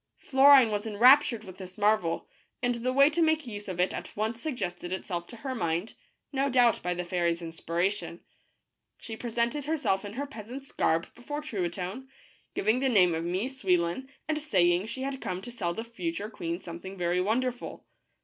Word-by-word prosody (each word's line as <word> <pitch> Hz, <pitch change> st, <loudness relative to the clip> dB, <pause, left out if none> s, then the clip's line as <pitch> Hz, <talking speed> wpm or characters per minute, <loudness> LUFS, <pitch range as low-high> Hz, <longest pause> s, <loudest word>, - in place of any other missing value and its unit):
Florine 270 Hz, -3 st, +6 dB
was 205 Hz, +1 st, -2 dB
enraptured 235 Hz, +2 st, +5 dB
with 185 Hz, -2 st, -11 dB
this 185 Hz, +1 st, -9 dB
marvel, 205 Hz, -5 st, +1 dB, 0.4 s
and 245 Hz, 0 st, +2 dB
the 240 Hz, +2 st, -1 dB
way 275 Hz, +2 st, +6 dB
to 315 Hz, +3 st, 0 dB
make 315 Hz, -2 st, +2 dB
use 210 Hz, -3 st, -7 dB
of 185 Hz, -2 st, -5 dB
it 180 Hz, -, +2 dB
at -, -, -7 dB
once 220 Hz, +2 st, -2 dB
suggested 180 Hz, -, -4 dB
itself 175 Hz, -2 st, -4 dB
to -, -, -11 dB
her 260 Hz, +3 st, -5 dB
mind, 170 Hz, -2 st, -1 dB, 0.4 s
no 275 Hz, +1 st, +1 dB
doubt 245 Hz, -3 st, +4 dB
by 180 Hz, 0 st, -1 dB
the 180 Hz, 0 st, -3 dB
fairy's 170 Hz, -1 st, 0 dB
inspiration. 170 Hz, +2 st, -2 dB, 0.8 s
She 225 Hz, -, -7 dB
presented 235 Hz, +5 st, -1 dB
herself 280 Hz, -11 st, 0 dB
in 205 Hz, 0 st, -7 dB
her 280 Hz, +5 st, -3 dB
peas 230 Hz, -6 st, -10 dB
ant's 270 Hz, +2 st, -8 dB
garb 165 Hz, +1 st, 0 dB
before 290 Hz, +5 st, -6 dB
Truitonne, 190 Hz, -, -4 dB, 0.5 s
giving 220 Hz, +5 st, +2 dB
the 265 Hz, 0 st, +2 dB
name 185 Hz, -7 st, +5 dB
of 165 Hz, 0 st, -2 dB
Mie 185 Hz, +7 st, -1 dB
Souil 195 Hz, -10 st, +1 dB
lon 175 Hz, +11 st, -3 dB, 0.2 s
and 310 Hz, -1 st, 0 dB
saying 180 Hz, -, +2 dB
she 260 Hz, +3 st, -4 dB
had 270 Hz, 0 st, -4 dB
come 180 Hz, 0 st, -3 dB
to 245 Hz, -, -7 dB
sell 175 Hz, -8 st, -2 dB
the 225 Hz, -, -4 dB
future 205 Hz, -2 st, -4 dB
queen 170 Hz, -3 st, -4 dB
something 185 Hz, +2 st, -8 dB
very 175 Hz, 0 st, +1 dB
wonderful. 245 Hz, +5 st, -2 dB
215 Hz, 190 wpm, -29 LUFS, 180-255 Hz, 0.8 s, Florine